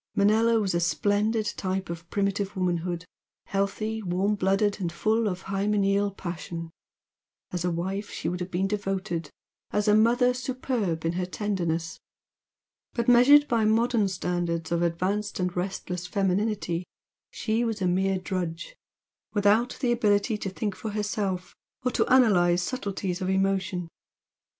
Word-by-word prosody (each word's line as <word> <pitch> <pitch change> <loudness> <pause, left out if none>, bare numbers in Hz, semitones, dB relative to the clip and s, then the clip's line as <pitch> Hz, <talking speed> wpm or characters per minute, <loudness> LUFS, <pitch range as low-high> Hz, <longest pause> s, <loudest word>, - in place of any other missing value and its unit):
Manella 220 +3 +4
was 195 -4 0
a 170 - +2
splendid 205 +6 +1
type 190 -1 -2
of 170 0 -7
primitive 200 0 -1
womanhood, 175 -1 -1 0.4
healthy, 215 +3 -1
warm 190 +2 0
blooded 200 +1 +1
and 170 -2 -1
full 220 +5 +1
of 185 -2 -3
hymeneal 200 0 +1
passion, 170 -3 -6 0.8
as 175 -1 -2
a 180 - +1
wife 190 +4 -3
she - - -4
would 180 +1 -2
have 180 0 -4
been 185 +2 0
devoted, 195 -5 -2 0.4
as 210 +1 0
a 210 - +6
mother 240 +3 +4
superb 250 -10 -2
in 165 - +1
her 180 +1 -1
tenderness; 170 -5 -2 0.9
but, 235 -1 -1
measured 270 +5 +7
by 230 -2 +2
modern 225 0 +3
standards 175 -3 -2
of 170 0 +1
advanced 185 +5 -1
and 180 -1 -1
restless 180 -1 -3
femininity 195 -2 0 0.5
she 225 +1 -1
was 225 -2 -1
a 190 - 0
mere 190 +2 +2
drudge, 185 - -4 0.6
without 210 +4 +3
the 245 -3 +2
ability 215 -1 +2
to 205 -2 -3
think 205 +1 -3
for 220 - -5
herself 205 -3 -2 0.3
or 250 - +1
to - - 0
analyse 180 -9 +5
subtleties 195 -6 -3
of 185 - -1
emotion. 190 -2 0
195 Hz, 145 wpm, -27 LUFS, 180-215 Hz, 0.9 s, measured